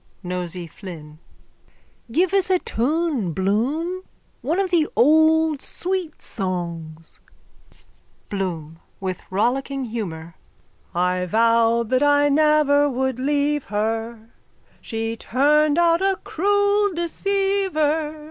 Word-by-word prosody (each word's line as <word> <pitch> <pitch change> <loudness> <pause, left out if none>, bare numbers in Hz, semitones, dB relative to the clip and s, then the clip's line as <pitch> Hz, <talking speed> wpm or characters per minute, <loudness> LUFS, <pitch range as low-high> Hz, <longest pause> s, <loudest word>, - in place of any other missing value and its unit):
NOSEY 180 -1 -4
FLYNN: 160 -3 -11 0.9
Give 355 +7 +1
us 390 -2 +2
a 370 - +4
tune, 275 - -1
Bloom. 265 - -1 0.4
One 325 +8 -1
of 385 -2 0
the 325 -3 +3
old 315 +2 +4
sweet 360 -3 -4
songs. 170 -5 -5 1.1
BLOOM: 165 -5 -4 0.2
(With 185 -2 -4
rollicking 260 +7 -1
humour.) 170 -8 -6 0.6
I 180 +1 0
vowed 230 +2 +2
that 255 0 +2
I 290 0 +4
never 290 -1 +3
would 260 -1 -2
leave 290 +1 0
her, 225 +2 -3 0.5
She 225 0 -3
turned 295 +6 +2
out 340 0 +3
a 390 -1 +1
cruel 405 +1 +1
deceiver. 340 -4 0
270 Hz, 100 wpm, -22 LUFS, 200-320 Hz, 1.1 s, a